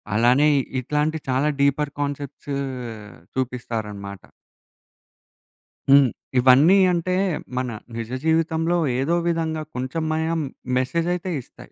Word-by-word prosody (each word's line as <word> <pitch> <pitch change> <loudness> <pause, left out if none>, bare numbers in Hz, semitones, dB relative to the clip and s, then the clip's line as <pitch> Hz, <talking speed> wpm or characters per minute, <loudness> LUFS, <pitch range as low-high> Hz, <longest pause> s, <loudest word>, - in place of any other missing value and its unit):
అలానే 125 +7 +4 0.3
ఇట్లాంటి 150 +4 0
చాలా 130 +3 +2
డీపర్ 140 +1 +2
కాన్సెప్ట్స్ 145 0 -4 0.8
చూపిస్తారనమాట. 110 -6 -4 1.7
హ్మ్. 140 -1 +8 0.3
ఇవన్నీ. 135 +9 +6 0.2
అంటే, 175 +1 -1 0.4
మన 130 0 0 0.3
నిజ 115 -1 -4 0.2
జీవితంలో 160 +1 +1 0.2
ఏదో 160 +6 +1
విధంగా 160 -2 -1
కొంచెమయినా 160 +5 -1 0.4
మెసేజ్ 165 +7 0
అయితే 180 +1 -4
ఇస్తాయి. - - -16
145 Hz, 90 wpm, -23 LUFS, 130-160 Hz, 1.7 s, హ్మ్